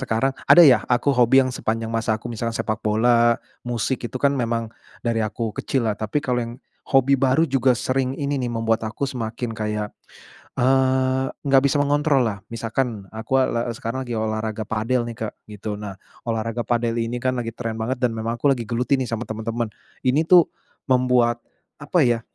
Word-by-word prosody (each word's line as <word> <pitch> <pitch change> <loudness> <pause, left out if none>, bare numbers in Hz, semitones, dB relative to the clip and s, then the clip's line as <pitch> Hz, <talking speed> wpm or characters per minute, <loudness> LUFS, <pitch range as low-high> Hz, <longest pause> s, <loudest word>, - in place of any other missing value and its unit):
sekarang 135 +3 0 0.2
ada 175 - +10
ya 130 - +6
aku 135 +3 +2
hobi 125 +2 +5
yang 130 - -4
sepanjang 115 0 -2
masa 110 -1 0
aku 115 - -9
misalnya 115 -1 -3
sepak 110 -1 -2
bola, 115 +2 +3 0.2
musik 120 +2 -2
itu 130 - -4
kan 140 +1 +2
memang 115 -2 -1 0.4
dari 115 -1 +1
aku 110 0 -3
kecillah, 115 -6 0
tapi 110 +7 -2
kalau 125 -3 -1
yang 115 0 -6 0.4
hobi 135 0 +4
baru 135 +5 +3
juga 130 -2 +2
sering 130 +2 0
ini 145 0 -1
nih 125 -3 -2
membuat 115 -1 0
aku 110 +6 -3
semakin 120 -2 -4
kayak, 105 -1 -3 0.7
eee, 130 0 +2 0.2
nggak 135 0 +5
bisa 145 +1 +2
mengontrollah, 140 -8 +1
misalkan 115 -3 -2
aku, 110 +4 0
eee, 130 - +2
la - - +1
sekarang 115 +4 -4
lagi 120 - -6
olahraga 110 -1 -2
padel 115 +3 0
nih 115 - -7
Kak 105 - -4 0.2
gitu, 105 0 -6
nah 100 -2 -6 0.3
olahraga 115 +1 -2
padel 120 -1 +1
ini 115 +1 -2
kan 130 +1 0
lagi 115 -1 -4
tren 115 -2 -3
banget 125 +4 -1
dan 120 - +2
memang 115 +1 -3
aku 140 +3 +3
lagi 120 -4 -4
geluti 125 +4 +1
nih 130 - -2
sama 115 +1 -3
teman-teman, 110 +1 -3 0.3
ini 145 +6 +2
tuh 175 -3 +8 0.4
membuat 125 -2 +2 0.4
apa 145 +1 +2
ya, 120 -2 +2
120 Hz, 185 wpm, -22 LUFS, 110-130 Hz, 0.7 s, ada